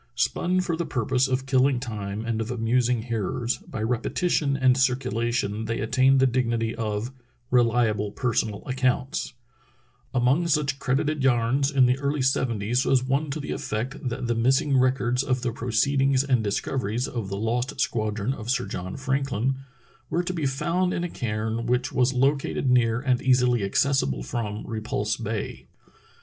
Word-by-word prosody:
Spun 180 +8 +1
for 175 -2 -1
the 170 - -2
pur 125 -8 -2
pose 130 +1 +2
of 130 0 -1
killing 130 -1 +3
time 105 -3 -5
and 115 -1 -1
of 110 - -4
amusing 120 0 +1
hearers, 120 +1 -2
by 110 -4 -6
repetition 140 +5 0
and 130 -2 +4
circulation 120 -4 0
they 115 +1 -2
attain 130 +4 +3
the 130 - +4
dignity 115 -3 0
of 110 +2 -3 0.4
"reHable 115 -4 +2
personal 110 -4 -1
accounts," 130 +2 -1 0.8
Among 130 +7 +2
such 140 -4 +1
credited 145 +2 0
"yarns" 130 +2 +2
in 135 -3 +4
the 125 +2 +2
early 140 0 -1
seventies 120 -2 +1
was 130 -2 +2
one 140 +3 0
to 140 - -3
the 145 - -5
effect 125 +5 -3
that 125 +1 -4
the 120 - +1
missing 130 +4 +2
records 125 -1 +2
of 130 -2 -1
the 120 - 0
proceedings 135 +4 +1
and 130 -5 +1
dis 100 -1 0
coveries 125 -1 -2
of 115 -6 -4
the 100 - -3
lost 120 +6 -2
squadron 110 +1 -1
of 115 -3 -8
Sir 125 -1 +1
John 90 +1 -5
Franklin 135 -2 -1 0.5
were 175 - 0
to 185 - -3
be 160 -5 -1
found 170 +7 0
in 175 - -2
a 175 - -2
cairn 110 -1 -3
which 125 +2 0
was 125 0 +3
located 135 0 +1
near 120 -2 +3
and 125 -2 +1
easily 125 -3 +3
accessible 100 - +1
from 105 - -4
Repulse 110 -1 -2
Bay. 110 -1 -5
125 Hz, 165 wpm, -25 LUFS, 115-135 Hz, 0.8 s, and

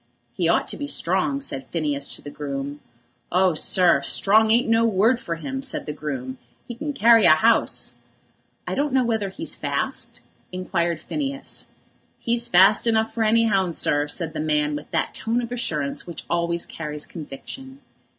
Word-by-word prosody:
"He - - 0
ought - - +2
to - - -3
be 285 - -4
strong," 190 - 0
said 135 - -4
Phineas 145 -4 -2
to - - -8
the 145 - -8
groom. 140 0 -5 0.5
"Oh, 185 0 +3
sir; 170 -1 +3
strong 215 +9 +3
ain't 235 +3 +3
no 225 0 +3
word 225 +3 +3
for 170 - -4
him," 265 +11 -5
said 270 -1 -6
the 150 - -4
groom; 130 -4 -5 0.3
"'e 240 - -5
can 295 +5 -4
carry 230 -6 +6
a 155 -1 +7
'ouse." 230 0 +2 0.7
"I - - -2
don't 285 0 -1
know 260 -1 +4
whether 220 -4 -1
he's 315 +12 -2
fast?" - - -3 0.3
inquired 175 -3 -1
Phineas. 275 - -4 0.5
"He's 235 0 0
fast 190 +6 +5
enough 225 -1 +2
for 225 -1 0
any 230 +1 +4
'ounds, 190 -5 +1
sir," 145 0 +1
said 160 +2 -4
the - - -4
man 150 -1 +1
with 145 - -7
that - - -1
tone 230 +2 -1
of 240 -1 -4
assurance 155 -14 -2
which 170 - -7
always 170 0 -1
carries 150 -2 -5
conviction. 265 - -9
190 Hz, 175 wpm, -23 LUFS, 155-235 Hz, 0.7 s, a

